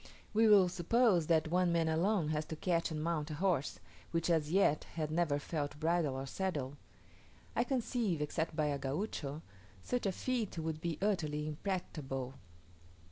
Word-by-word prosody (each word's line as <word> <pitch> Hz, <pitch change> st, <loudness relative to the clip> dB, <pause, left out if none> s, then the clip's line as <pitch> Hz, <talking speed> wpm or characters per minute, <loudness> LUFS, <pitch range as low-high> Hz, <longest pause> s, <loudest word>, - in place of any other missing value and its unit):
We 220 Hz, +1 st, +5 dB
will 200 Hz, -3 st, +7 dB
suppose 180 Hz, 0 st, +3 dB
that 160 Hz, -1 st, +3 dB
one 180 Hz, 0 st, +3 dB
man 165 Hz, -1 st, +2 dB
alone 165 Hz, +1 st, +2 dB
has 155 Hz, 0 st, 0 dB
to 160 Hz, -, -5 dB
catch 170 Hz, +1 st, 0 dB
and 155 Hz, -2 st, -3 dB
mount 160 Hz, -2 st, -1 dB
a 155 Hz, -, -4 dB
horse, 170 Hz, -5 st, 0 dB, 0.3 s
which 165 Hz, +1 st, 0 dB
as 155 Hz, -2 st, +1 dB
yet 180 Hz, -5 st, +3 dB
had 155 Hz, -2 st, -2 dB
never 160 Hz, -3 st, +2 dB
felt 145 Hz, -1 st, -3 dB
bridle 160 Hz, -3 st, +1 dB
or 135 Hz, +1 st, -3 dB
saddle. 145 Hz, -4 st, -2 dB, 0.8 s
I 235 Hz, -, +3 dB
conceive, 240 Hz, -, 0 dB
except 155 Hz, +2 st, -2 dB
by 155 Hz, -1 st, +1 dB
a 145 Hz, -1 st, 0 dB
Gaucho, 145 Hz, 0 st, -3 dB, 0.4 s
such 245 Hz, -4 st, -1 dB
a -, -, +2 dB
feat 230 Hz, -1 st, -2 dB
would 160 Hz, -1 st, -3 dB
be 170 Hz, -2 st, -2 dB
utterly 155 Hz, -7 st, 0 dB
impracticable. 150 Hz, -6 st, -3 dB
165 Hz, 165 wpm, -34 LUFS, 150-185 Hz, 0.8 s, will